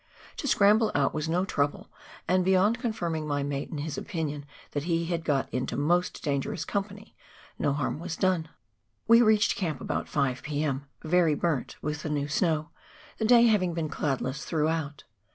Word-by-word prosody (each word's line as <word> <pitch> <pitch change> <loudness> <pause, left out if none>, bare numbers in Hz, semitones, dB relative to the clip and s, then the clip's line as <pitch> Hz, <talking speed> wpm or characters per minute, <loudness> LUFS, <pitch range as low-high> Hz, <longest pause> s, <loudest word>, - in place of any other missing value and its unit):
To 285 - -3
scramble 215 -1 +4
out 140 -1 +2
was 155 +1 -2
no 180 +3 +1
trouble, 145 -6 -1 0.4
and, 185 +1 +3
beyond 190 +5 +3
confirming 170 -10 -2
my 145 -1 -1
mate 140 0 -3
in 155 - -5
his 145 0 -3
opinion 150 -5 -4 0.2
that 145 +1 -3
he 170 -1 0
had 170 -1 -2
got 140 -4 +1
into 125 0 -2
most 175 +5 +1
dangerous 145 +2 -2
company, 200 +3 -4 0.4
no - - +1
harm 145 +1 -2
was 170 0 -4
done! 180 -4 +1 0.6
We 230 +1 +7
reached 215 -2 +4
camp 160 -8 -2
about - - -3
5 135 -3 0
p.m., 145 -2 -2 0.2
very 165 -1 +3
burnt 150 -5 -1
with 150 0 -3
the 155 - -4
new 145 -1 -1
snow, 155 0 0 0.5
the 220 - +1
day 235 +1 +7
having 185 -7 +2
been 160 -2 -2
cloudless 135 -2 -2
throughout. 155 -2 -1
160 Hz, 170 wpm, -28 LUFS, 145-185 Hz, 0.6 s, We